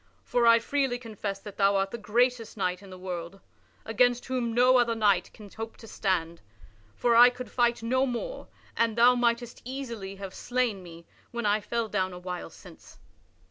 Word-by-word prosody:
For 240 -1 +1
I 230 0 +8
freely 265 +1 -1
confess 215 -4 -5
that 205 - -10
thou 200 0 +3
art 195 0 0
the 235 - -5
greatest 230 +1 0
knight 180 -1 -1
in 200 - -13
the 185 - -10
world, 180 0 -6 0.5
against 245 +2 +2
whom 250 -3 -2
no 250 +2 +5
other 235 -1 +2
knight 200 -5 +2
can 210 - -13
hope 225 +3 -8
to 225 - -13
stand; 170 -6 -2 0.5
for 235 - +2
I 240 +1 +9
could 250 0 -9
fight 240 -2 +1
no 260 +3 +1
more 250 - -5 0.3
and 230 -1 +1
thou 240 +2 +7
mightest 240 -1 -1
easily 235 -7 -6
have 195 -1 -8
slain 245 -5 -1
me 170 -1 -12 0.2
when 235 -2 -4
I 210 +1 +2
fell 235 +1 -2
down 190 -3 -1
a - - -8
while 180 0 -6
since." - - -15
230 Hz, 185 wpm, -28 LUFS, 195-245 Hz, 0.5 s, I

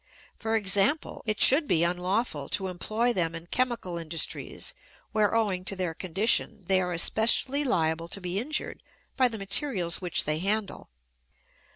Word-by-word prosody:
For 225 0 -1
example, 205 +7 +1
it 215 -1 -1
should 290 +3 +7
be 165 -8 +2
unlawful 180 - -1
to 190 -1 0
employ 215 +7 -1
them 170 -4 -1
in 165 0 -8
chemical 235 -5 -2
industries 165 - -1 0.4
where, 215 0 +1
owing 200 -5 0
to 195 - 0
their 180 -3 -3
condition, 200 +4 0
they 190 +1 +2
are 180 -1 -2
especially 230 - +2
liable 165 - 0
to 195 - -3
be 180 +1 -3
injured 300 +7 -3 0.3
by 260 -2 +4
the 230 -2 -5
materials 195 -4 0
which 180 -2 -1
they 150 +1 -1
handle. 205 +3 -2
195 Hz, 155 wpm, -27 LUFS, 175-225 Hz, 0.4 s, should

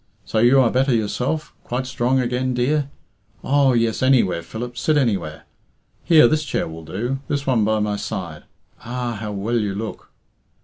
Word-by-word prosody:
So 110 - -1
you 120 +4 +5
are 120 - +3
better 130 0 +2
yourself? 125 +8 -2
Quite 125 +2 -3
strong 130 0 0
again, 125 +1 -1
dear? 140 +3 0 0.5
Oh, 140 -1 +3
yes, 115 -2 +1
any 130 -1 +5
where, 90 -3 -2
Philip 120 +8 -7
sit 150 +4 +1
anywhere. 100 - -1 0.6
Here, 160 -7 +6
this 155 +4 +1
chair - - -2
will 80 0 -9
do 115 +12 -3
this 140 -1 -2
one 125 -5 +2
by 110 +1 +2
my 105 -1 -1
side. 90 -8 -6 0.4
Ah! 120 0 -3
How 105 -1 -4
well 105 +4 -1
you 100 -3 -2
look!" 110 +2 -6
120 Hz, 175 wpm, -21 LUFS, 105-130 Hz, 0.6 s, Here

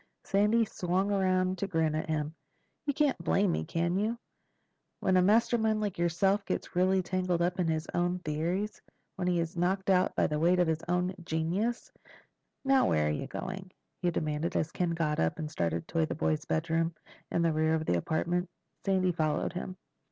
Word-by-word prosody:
Sandy 210 +4 +3
swung 190 +1 -1
around 185 -1 +1
to 200 - -1
grin 160 -4 +1
at 155 +1 -2
him. 155 0 -1 0.5
"You 285 - +2
can't 295 -3 +1
blame 195 -2 +2
me, - - -1
can 170 +2 -1
you? 220 +3 0 0.8
When 190 - +2
a 185 - +6
mastermind 220 +2 +3
like 205 -5 -3
yourself 190 +4 +2
gets 175 - -4
really 185 +1 +3
tangled 180 -1 0
up 180 +2 0
in 175 - +2
his 160 0 0
own 175 +1 +1
theories—when 180 +3 -4
he 175 -1 +2
is 165 0 -2
knocked 190 +3 +1
out 185 -1 +3
by - - +3
the 150 0 -1
weight 175 +3 +4
of 180 - +4
his 160 0 0
own 180 +1 +1
genius—Now 215 - -2
where 75 -1 +2
are - - +1
you 75 - -3
going?" 190 -1 -6 0.3
he 180 - +2
demanded 155 -1 -2
as 155 - 0
Ken 180 -1 0
got 165 -2 0
up 80 - +1
and 155 -1 -4
started 85 - -1
toward 165 -2 0
the - - -2
boys' 80 -1 0
bedroom 165 - 0 0.3
in 170 - +1
the 165 -1 +2
rear 155 +1 +2
of 160 0 -2
the 85 - +2
apartment. 175 - -1 0.3
Sandy 190 -2 +2
followed 155 -1 0
him. 185 +1 -5
175 Hz, 185 wpm, -30 LUFS, 160-190 Hz, 0.8 s, a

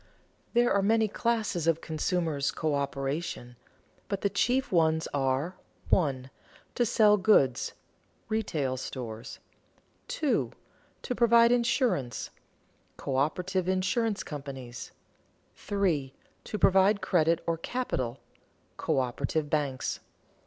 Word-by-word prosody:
_ - - -31 0.5
There 240 0 +4
are 200 - +3
many 220 +2 +3
classes 215 -6 -1
of 165 -1 +3
consumers' 160 -3 -1
coöperation, 140 -3 -2 0.5
but 200 -2 -3
the 200 - +1
chief 255 +7 +1
ones 160 -2 +2
are: 140 +5 0 0.3
(1) 135 -6 +1 0.4
to 240 - +1
sell 210 -2 +5
goods 185 - +3 0.5
(retail 155 -12 -1
stores); 120 -3 -6 0.7
(2) 405 - 0 0.5
to 250 - -2
provide 235 0 +5
insurance 235 - +1 0.7
(coöperative 175 +7 -1
insurance 195 +4 0
companies); 135 -4 -7 0.6
(3) 170 -10 -1 0.3
to 210 - -4
provide 195 +1 +4
credit 165 -2 +2
or 165 -1 -1
capital 135 - -3 0.6
(coöperative 135 +4 -1
banks). 140 -4 -1
170 Hz, 100 wpm, -29 LUFS, 140-210 Hz, 0.7 s, sell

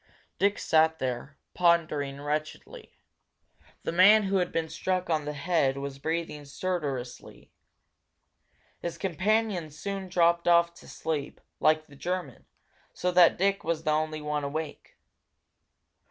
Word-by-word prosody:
Dick 200 +1 +2
sat 160 0 +3
there, 130 +1 -4 0.2
pondering 155 -5 +1
wretchedly. 150 +1 -5 0.9
The - - -2
man 200 +5 +7
who 195 0 +1
had 180 -1 0
been 165 -1 -1
struck 185 +3 -2
on 155 -2 0
the 150 - -3
head 145 -3 +1
was 140 0 -6
breathing 160 0 -3
stertorously. 140 -5 -5 1.3
His 170 -1 -5
companion 195 -1 0
soon 195 +5 -5
dropped 170 -1 +2
off 170 0 +4
to - - -16
sleep, 150 -3 -4 0.2
like 155 0 +3
the 140 - -17
German, 175 -3 -4 0.5
so 180 - 0
that 175 -1 +6
Dick 195 +2 +1
was 160 0 -2
the 155 - +1
only 155 0 -1
one 150 -1 -2
awake. 150 +2 -5
160 Hz, 130 wpm, -28 LUFS, 150-180 Hz, 1.3 s, man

